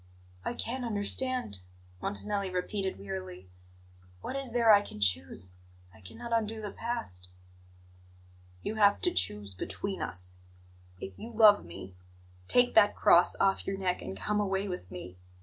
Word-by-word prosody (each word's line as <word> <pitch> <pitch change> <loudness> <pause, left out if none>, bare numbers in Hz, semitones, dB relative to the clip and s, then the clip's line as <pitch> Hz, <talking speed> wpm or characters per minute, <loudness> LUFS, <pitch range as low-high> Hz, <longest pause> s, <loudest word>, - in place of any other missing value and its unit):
"I - - -2
can't 250 +2 -3
understand," 230 - 0 0.4
Montanelli 200 - -2
repeated 190 +1 -2
wearily. 95 -2 -7 0.7
"What - - -5
is 270 -3 -3
there 230 -2 +5
I 205 - +7
can 155 - -9
choose? 90 -1 +1 0.4
I - - -18
cannot 235 - -7
undo 225 -1 0
the 210 -2 -5
past." 90 - -4 1.3
"You 220 - -3
have 205 -1 +5
to - - +1
choose 100 +2 0
between 195 - -4
us. 90 0 -5 0.6
If 95 -1 -8
you 230 - -7
love 215 -2 +6
me, 90 +2 -9 0.5
take 245 0 +4
that 205 -2 +6
cross 175 - +5
off 195 0 +1
your 195 - -1
neck 185 -2 -1
and 95 +1 -6
come 210 - -1
away 195 -1 0
with 180 - -6
me. 90 0 -9
195 Hz, 150 wpm, -30 LUFS, -, 1.3 s, I